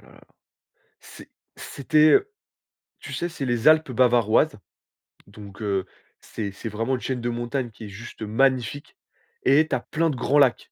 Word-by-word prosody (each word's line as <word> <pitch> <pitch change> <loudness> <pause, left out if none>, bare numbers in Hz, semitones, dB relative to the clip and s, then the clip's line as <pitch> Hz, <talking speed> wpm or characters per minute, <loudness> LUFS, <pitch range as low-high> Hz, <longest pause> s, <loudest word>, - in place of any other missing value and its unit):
la. - - -18 0.8
C'est - - -14 0.3
c'était 155 +2 +3 0.8
tu - - -9
sais, 175 - -3
c'est 155 -5 -5
les 120 +1 0
Alpes 155 -3 +5
bavaroises, 120 +3 +3 0.7
donc 100 0 -13
heu, 100 -3 -1 0.3
c'est 100 -3 -6
c'est 110 +3 -7
vraiment 115 +5 -2
une 125 - -6
chaîne 130 -2 -3
de 120 - -2
montagne 120 +1 -3
qui 110 - -11
est - - -8
juste 110 +3 -11
magnifique, 130 - 0 0.5
et 150 +3 +4
tu 135 - -1
as - - -1
plein 165 +6 -1
de 145 - -3
grands 140 +4 +1
lacs. 130 -4 +2
125 Hz, 160 wpm, -24 LUFS, 110-140 Hz, 0.8 s, Alpes